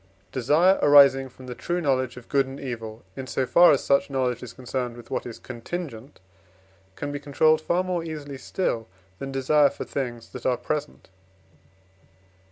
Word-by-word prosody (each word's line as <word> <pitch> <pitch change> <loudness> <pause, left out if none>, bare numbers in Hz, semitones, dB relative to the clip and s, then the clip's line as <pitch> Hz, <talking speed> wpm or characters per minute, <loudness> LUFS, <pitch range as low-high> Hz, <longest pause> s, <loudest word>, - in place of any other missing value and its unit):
Desire 150 +9 +3
arising 140 -2 +6
from 130 0 -14
the 125 - -6
true 175 +8 -2
knowledge 130 -6 0
of 125 - -11
good 135 -1 +2
and 135 +1 -8
evil, 115 -3 -6
in 135 -1 -6
so 130 - -1
far 175 +7 +7
as 140 - +2
such 140 +1 +2
knowledge 125 -3 -1
is 125 - -8
concerned 125 -1 -4
with 120 -1 -13
what - - -2
is 115 - -8
contingent, 130 0 -7 0.8
can 145 - -4
be 145 - -4
controlled 155 +3 +3
far 175 +3 +1
more 180 -2 -2
easily 145 -4 -7
still, 115 - -2 0.3
than 135 0 -5
desire 140 +2 +4
for - - -7
things 120 -4 -4
that 125 - -9
are 125 -1 +1
present. 150 -4 -4
135 Hz, 175 wpm, -25 LUFS, 125-150 Hz, 0.8 s, far